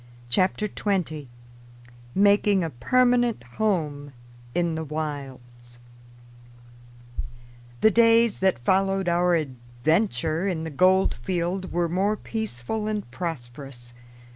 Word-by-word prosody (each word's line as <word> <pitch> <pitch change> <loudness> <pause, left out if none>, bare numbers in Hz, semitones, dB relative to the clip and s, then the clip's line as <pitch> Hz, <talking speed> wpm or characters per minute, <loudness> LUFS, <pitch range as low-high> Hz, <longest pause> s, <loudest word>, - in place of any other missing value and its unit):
] 120 0 -22
CHAPTER 185 - +2
TWENTY 170 - -2 0.9
MAKING 200 -1 +4
A 165 - -3
PERMANENT 245 - +2 0.2
HOME 150 -9 -1 0.4
IN 170 -1 +1
THE 160 0 -3
WILDS 135 -6 -6 2.0
THE 220 - +6
days 230 +1 +4
that 185 -11 +1
followed 195 +1 +2
our 175 -2 +2 0.4
venture 160 - +1
in 170 -4 -2
the 160 - -5
gold 185 +6 +4
field 180 +7 -3
were 175 0 +1
more 195 +5 0
peaceful 215 - -4
and 210 - -3
prosperous. 130 -5 -6
175 Hz, 105 wpm, -25 LUFS, 145-200 Hz, 2.0 s, THE